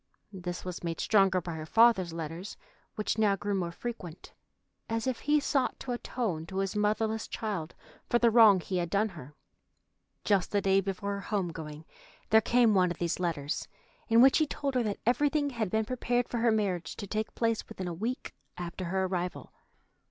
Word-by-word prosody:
This 180 -1 -5
was 180 -1 -6
made 165 -1 -3
stronger 195 -3 +3
by 175 -1 -6
her 155 -1 -6
father's 225 -4 +4
letters, 165 +4 -6 0.4
which 215 +1 -1
now 205 -2 +4
grew 205 +1 -3
more 180 -3 -1
frequent, 180 -4 -7 0.6
as 225 0 -1
if 260 -2 -1
he 300 +1 +2
sought 275 -2 0
to 255 - -4
atone 220 -9 -3
to 190 - -6
his 195 +1 -1
motherless 215 +1 0
child 195 -8 -4 0.3
for 240 - +4
the 235 -1 +4
wrong 220 -4 +7
he 185 +3 -3
had 175 -1 -1
done 205 +4 +1
her. 150 -6 -11 0.9
Just 200 -3 +1
the 205 - +2
day 195 0 +3
before 195 +1 -3
her 200 - -4
home 195 -4 -1
going 155 -1 -8 0.5
there 220 0 +7
came 235 0 +4
one 185 -2 +4
of 175 - -4
these 170 0 -1
letters, 155 -5 -2 0.4
in 230 +1 +6
which 270 +3 +6
he 310 - +2
told 280 -1 -3
her 250 - +2
that 210 -3 -2
everything 285 +4 +2
had 225 -5 -2
been 220 +2 0
prepared 245 0 0
for 240 - -3
her 230 0 +3
marriage 195 -6 -1
to 205 - -6
take 215 +2 -3
place 230 -1 0
within 185 - -5
a 175 - -3
week 230 +9 -4 0.2
after 175 +1 -5
her 190 +2 0
arrival. 180 -1 -4
200 Hz, 195 wpm, -30 LUFS, 180-230 Hz, 0.9 s, wrong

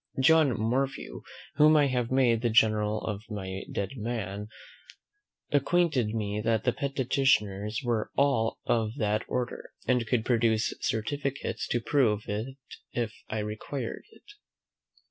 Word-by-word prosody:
John 150 -3 +4
Morphew, 130 +5 -1 0.4
whom 155 +1 +7
I 145 - +5
have 125 -3 0
made 125 -4 +3
the 120 - +1
general 110 -1 +3
of 105 -2 -4
my 95 -2 -5
dead 100 - -2
men, 105 -3 -4 1.0
acquainted 145 -6 +2
me 105 -1 -2
that 115 -1 +1
the 125 - +2
petitioners 125 -6 +1
were 120 -3 0
all 135 -5 +2
of 110 -1 0
that 105 -2 0
order, 125 -1 -4
and 125 -3 +2
could 115 0 +1
produce 115 -2 +2
certificates 140 +5 -2
to 120 - 0
prove 115 -7 +2
it 110 +6 -4 0.3
if 115 -3 -2 0.2
I 110 - -2
required 110 +4 -4
it. - - -20
115 Hz, 130 wpm, -28 LUFS, 105-130 Hz, 1.0 s, whom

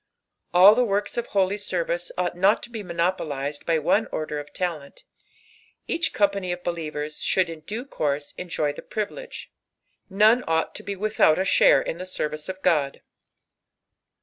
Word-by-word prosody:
Ail 190 +4 +9
Vie 245 - +2
loorks 205 -3 0
qf 240 - -3
holy 195 0 +1
ser^^ee 175 -3 -2
ovght 180 -1 0
not 190 +4 +3
to 240 - -8
be 225 -2 -5
raonopoiised 165 -5 -2
bu 160 -2 +1
one 215 +8 +2
order 150 -1 -3
qf 145 - -21
laleyit, 165 -6 -4 0.8
each 335 -2 0
company 200 -3 +1
qf 180 - -19
beiieoers 155 -3 -4
should 180 -3 +1
in 165 - -8
due 215 - -6
course 145 - -2
enjoy 160 -5 -2
the - - -9
priirUrye, 475 - -5 0.7
2t 195 +2 -4
ime 230 +4 +6
ought 160 0 0
to - - -8
be 200 - -5
mithoui 205 -6 +3
a 190 - 0
share 185 - +5
in 165 - -4
the 185 - -6
service 155 -4 -4
qf 190 0 -7
God. 150 -6 +1
180 Hz, 170 wpm, -24 LUFS, 155-200 Hz, 0.8 s, Ail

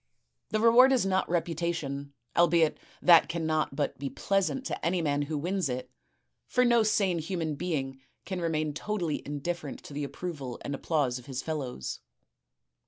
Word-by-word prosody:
The 215 - 0
reward 235 +4 +7
is 255 -7 +3
not 190 0 +1
reputation, 165 -5 -2 0.2
albeit 170 -2 +4 0.2
that 170 -2 +7
cannot 160 -3 0
but 145 -3 -2
be 140 0 -3
pleasant 195 - 0
to - - -4
any 175 +3 +1
man 145 -3 +1
who 150 +1 -2
wins 180 +1 -1
it, 125 0 -4 0.6
for 250 0 +3
no 235 -1 +5
sane 200 -5 +2
human 160 -1 -2
being 135 -5 -3 0.2
can 185 -2 -3
remain 155 -2 0
totally 175 -2 -2
indifferent 150 +1 -4
to - - -10
the 145 +1 -3
approval 140 -4 -5
and 140 - -3
tipplause 140 -4 0
of 125 - -16
his 130 -1 -4
fellows. 135 - -4
160 Hz, 160 wpm, -29 LUFS, 145-180 Hz, 0.6 s, reward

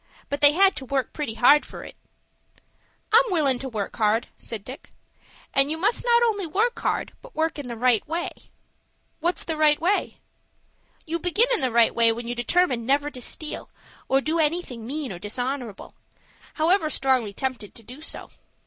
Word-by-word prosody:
But 285 - -3
they 290 0 +7
had 385 +3 +4
to 265 - -6
work 265 0 -2
pretty 290 -8 -3
hard 270 +6 +6
for - - -9
it." - - -11 1.2
"I'm 460 - +9
willin' 295 - +2
to 265 - -5
work 215 -4 -4
hard," 220 +1 +1
said 220 -4 -6
Dick. 260 +2 -10 0.6
"And 275 -1 +3
you 315 - -2
must 410 +8 +1
not 475 -1 +4
only 410 -6 0
work 440 +9 0
hard, - - -2
but - - -15
work 320 -1 -1
in 280 - -6
the 240 - -5
right 240 -1 +2
way." 335 +3 -2 0.9
"What's 345 +2 0
the 325 - -3
right 300 -1 +4
way?" 370 +5 0 0.9
"You 335 +1 -2
began 435 +9 +2
in 460 - 0
the 260 - +1
right 235 -1 +4
way 230 -1 +4
when 235 +1 -5
you 240 - -2
determined 245 -1 +1
never 285 +2 +1
to 255 - -9
steal, 305 +5 -4 0.4
or 270 +1 +3
do 315 +4 -1
anything 300 -8 -1
mean 285 -2 -3
or 175 - -7
dishonorable, 245 +2 -4 0.6
however 325 +1 +2
strongly 260 -6 +1
tempted 250 -2 -4
to 230 - -9
do 255 +7 -11
so. 320 - -8
285 Hz, 185 wpm, -24 LUFS, 240-335 Hz, 1.2 s, I'm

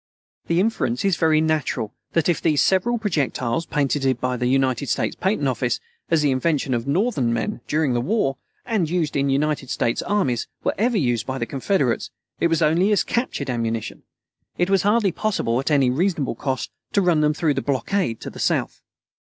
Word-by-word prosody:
The 170 +1 +2
inference 195 - 0
is 195 -3 +3
very 160 -1 +3
natural 155 -8 -1 0.2
that 165 -2 +2
if 175 - +1
these 155 -3 +2
several 210 +6 +2
projectiles, 155 - -1
patented 135 -3 0
by 125 0 -1
the 125 0 -1
United 130 0 +1
States - - 0
Patent 190 -7 0
Office, 125 -2 0 0.3
as 165 -2 +3
the 145 - +3
invention 140 0 0
of 120 +1 -2
Northern 145 - +1
men, 115 0 -2
during 150 -3 +1
the 120 - +1
war, 135 - 0 0.3
and 210 -9 0
used 165 -3 0
by 140 - +1
the 140 0 +1
United 140 -1 0
States 115 - 0
armies, 185 - 0 0.2
were - - +1
ever 235 +2 +1
used 120 - 0
by 130 0 -2
the 120 - -2
Confederates, 135 -1 0 0.3
it - - +3
was 165 -2 +1
only 175 +7 +3
as 210 - +3
captured 190 - -2
ammunition. 115 -2 -3 0.6
It 175 +2 +1
was 195 -2 +4
hardly 205 0 +2
possible, 165 - -1
at 135 - -2
any 140 -4 +3
reasonable 160 -3 0
cost, 130 +2 -3 0.2
to 200 - +3
run 170 -4 +3
them 150 0 +2
through 160 -2 +1
the 135 - -2
blockade 135 - -1
to - - -6
the - - -11
South. - - 0
150 Hz, 195 wpm, -22 LUFS, 130-180 Hz, 0.6 s, was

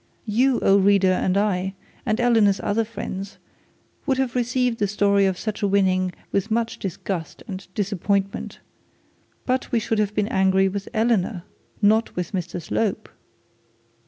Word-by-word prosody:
You, 245 +4 +2
O 195 +1 +5
reader, 195 -1 +4
and 185 +1 +1
I, 195 -2 0 0.3
and 215 +1 +1
Eleanor's 225 -5 +4
other 225 +2 +1
friends 200 -3 -6 0.7
would 265 -2 +2
have 260 -3 0
received 250 -1 0
the 205 - +2
story 200 -1 +3
of 190 -1 -1
such 215 +2 -4
a 205 - +2
winning 185 -2 +2 0.2
with 200 +2 0
much 230 +1 -1
disgust 185 -2 -5
and 195 -2 -7
disappointment; 200 -1 -1 0.8
but 255 0 -1
we 240 - +2
should 220 0 -1
have 210 0 0
been 205 -1 +1
angry 190 -3 +3
with 195 +1 -4
Eleanor, 220 -5 +1 0.4
not 220 +2 +3
with 180 -1 -3
Mr 175 -2 -3
Slope. 200 +4 -2
200 Hz, 150 wpm, -23 LUFS, 190-225 Hz, 0.8 s, O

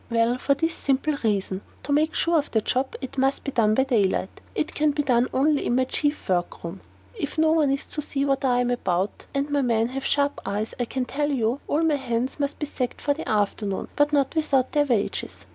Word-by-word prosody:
Well, 230 +1 +2
for 280 - +2
this 325 +3 0
simple 275 +2 0
reason: 195 -3 0 0.2
to 285 - -4
make 310 +2 +2
sure 335 -1 +3
of 290 - -4
the 220 - +1
job, 260 +4 -1
it 265 0 -5
must 270 +1 +1
be 275 - -3
done 215 -4 +3
by 265 - +4
daylight; 205 -7 0
it 305 - -1
can 300 -1 +2
be 295 0 0
done 250 -2 +3
only 290 +2 +2
in 240 - +1
my 260 - +3
chief 290 +3 -1
work 175 -2 -1
room; 170 +3 -6 0.3
if 325 - -5
no 315 0 +4
one 315 -3 +3
is 275 0 -1
to 300 - -4
see 280 -1 -1
what 275 -1 +1
I 245 -2 +3
am 245 0 0
about 190 -5 -1
(and 280 +1 -1
my 285 -1 +2
men 230 -2 +1
have 270 +1 -4
sharp 285 0 +1
eyes, 210 +2 -3
I 245 - +1
can 255 +2 -2
tell 290 +3 -1
you), 250 -1 0
all 310 +3 +1
my 310 -3 +3
hands 250 0 -2
must 285 0 -1
be 300 - -2
sacked 255 -4 -3
for 290 - +1
the 315 - -6
afternoon, 205 -1 -1
but 290 0 +3
not 280 -2 +2
without 290 -5 +1
their 295 -1 +3
wages. 235 -7 -2
270 Hz, 235 wpm, -25 LUFS, 230-290 Hz, 0.3 s, by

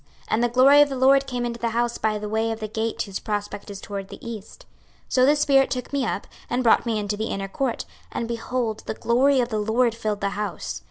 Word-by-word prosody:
26:043:004 140 - -34 0.2
And 225 +2 +2
the 240 - +3
glory 265 +4 +7
of 290 - +5
the 270 - -3
LORD 270 +1 +4
came 245 -2 -2
into 235 0 -4
the 235 - 0
house 235 +1 -1
by 215 -1 +1
the 210 0 -5
way 220 +2 0
of 225 0 -3
the 215 - -4
gate 220 +1 -2
whose 195 -2 -5
prospect 205 -1 -4
is 200 -1 -7
toward 200 -1 -6
the - - -10
east. 220 -3 -8 0.4
26:043:005 - - -7
So 255 -1 +5
the 295 - +5
spirit 275 -2 +4
took 250 +2 -4
me 275 -4 +1
up, 200 - -3 0.2
and 250 +1 0
brought 235 0 +4
me 225 -2 +1
into 205 0 -2
the 220 - -2
inner 195 0 -3
court; 245 +4 -2 0.3
and, 230 - -3
behold, 235 -1 -2
the - - -3
glory 260 +5 +3
of 240 - -1
the 215 -3 -1
LORD 225 +3 +2
filled 215 -3 -3
the 200 - +1
house. 210 +1 -4
230 Hz, 260 wpm, -24 LUFS, 210-255 Hz, 0.4 s, glory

